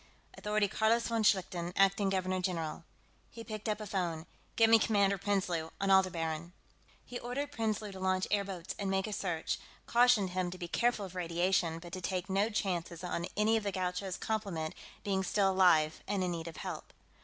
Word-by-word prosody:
Authority 210 0 +1
Carlos 225 +3 +2
von 230 -1 +1
Schlichten, 180 -4 +1
acting 195 0 +3
Governor 185 -1 0
General." 170 -4 -2 0.5
He 230 - -9
picked 215 -1 -5
up 210 0 -1
a 215 - -5
phone. 175 -6 -2 0.3
"Get 225 - +6
me 225 0 +7
Commander 200 -3 +2
Prinsloo, 185 -5 0
on 195 0 +1
Aldebaran...." 170 -3 +2 0.5
He 245 - -6
ordered 280 +4 -3
Prinsloo 215 -5 -2
to 190 - -9
launch 185 0 +1
airboats 195 -4 -1
and 200 -1 -1
make 190 0 +1
a 215 - -4
search; 175 -5 -2 0.3
cautioned 235 -6 +4
him 180 -1 -1
to 180 - -7
be 175 -2 -5
careful 235 +2 +1
of 185 - -10
radiation, 175 -1 +1
but 175 +1 -10
to 185 - -4
take 185 +1 -2
no 200 +3 +2
chances 180 -5 -2
on 175 -1 -2
any 220 +2 +4
of 220 - -2
the 200 - -1
Gaucho's 185 0 -2
complement 195 -8 -2 0.3
being 195 -2 0
still 195 0 +2
alive 170 -5 +4
and 195 -1 0
in 180 - 0
need 165 -1 -4
of 165 - -8
help. - - -6
190 Hz, 190 wpm, -32 LUFS, 175-210 Hz, 0.5 s, me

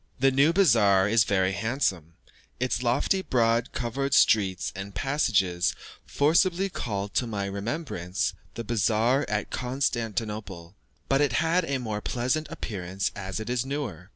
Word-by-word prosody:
The 135 +1 +4
new 140 +4 +4
bazaar 105 - +4
is 110 0 +4
very 95 -2 +1
handsome, 95 - -2 0.4
its 125 -1 -1
lofty, 125 +10 +1
broad 115 -5 +1
covered 135 +3 -1
streets 95 -5 +3
and 100 +1 -7
passages 100 -11 +1 0.3
forcibly 175 +6 +2
called 100 - -4
to 125 - 0
my 100 -3 -3
remembrance 100 - -3 0.2
the 115 - -4
bazaar 115 +4 +1
at 105 0 -2
Constantinople; 110 -8 -3 0.3
but 135 +1 +2
it 145 -4 +2
had 165 +7 +2
a 140 -3 -1
more 110 -4 -4
pleasant 130 +8 -1
appearance 95 -2 -4
as 95 0 -5
it 110 - -6
is 125 0 0
newer. 125 - -5
115 Hz, 140 wpm, -26 LUFS, 100-135 Hz, 0.4 s, The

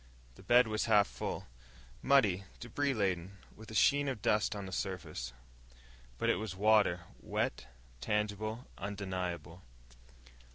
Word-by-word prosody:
The - - -16
bed 125 0 +5
was 110 0 0
half 105 -3 +5
full - - -5 0.6
muddy, 105 -9 +4
debris 135 +3 -1
laden, 95 -2 -1 0.2
with 110 0 -12
a 110 - -7
sheen 145 +6 +4
of 130 -5 -2
dust 105 0 +2
on 100 -1 -5
the 95 - -7
surface. 85 -10 -4 0.9
But - - -1
it - - +3
was 105 -3 -4
water 105 -3 +4 0.2
wet, - - -2 0.3
tangible, 105 - -2
undeniable. 90 -3 -4
105 Hz, 130 wpm, -33 LUFS, 95-110 Hz, 0.9 s, bed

